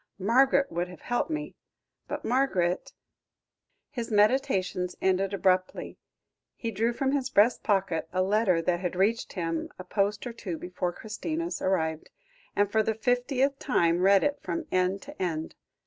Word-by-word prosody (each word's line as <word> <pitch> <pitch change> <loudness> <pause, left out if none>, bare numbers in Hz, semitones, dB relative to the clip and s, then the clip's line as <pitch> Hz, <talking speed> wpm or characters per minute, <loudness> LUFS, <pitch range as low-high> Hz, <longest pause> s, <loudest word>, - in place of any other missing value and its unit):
Margaret 265 +7 +3
would 175 +1 -1
have 180 -2 -12
helped 245 +5 -1
me 310 -1 -3 0.5
but - - -5
Margaret 195 -9 +1 0.5
" - - -53
His 235 -5 -4
meditations 205 -5 +2
ended 190 +1 +1
abruptly; 185 -1 0 0.6
he 230 - -4
drew 225 +3 +1
from 265 +3 -1
his 275 -2 0
breast 230 0 +4
pocket 190 -6 0
a 185 0 +1
letter 190 -4 +2
that 175 0 +1
had 180 -1 -3
reached 210 +5 +1
him 165 -3 -2
a 185 - -7
post 200 +3 -1
or 240 - -5
two 190 -8 -5
before 180 0 -3
Christina's 315 - -4
arrived, 160 -4 0 0.5
and 205 0 +2
for 220 - +3
the 220 0 0
fiftieth 250 +4 +1
time 170 -9 +2
read 195 +1 +5
it 290 0 0
from 330 0 -3
end 185 +2 +1
to 290 -4 -10
end. 160 -3 -2
200 Hz, 160 wpm, -28 LUFS, 180-245 Hz, 0.6 s, read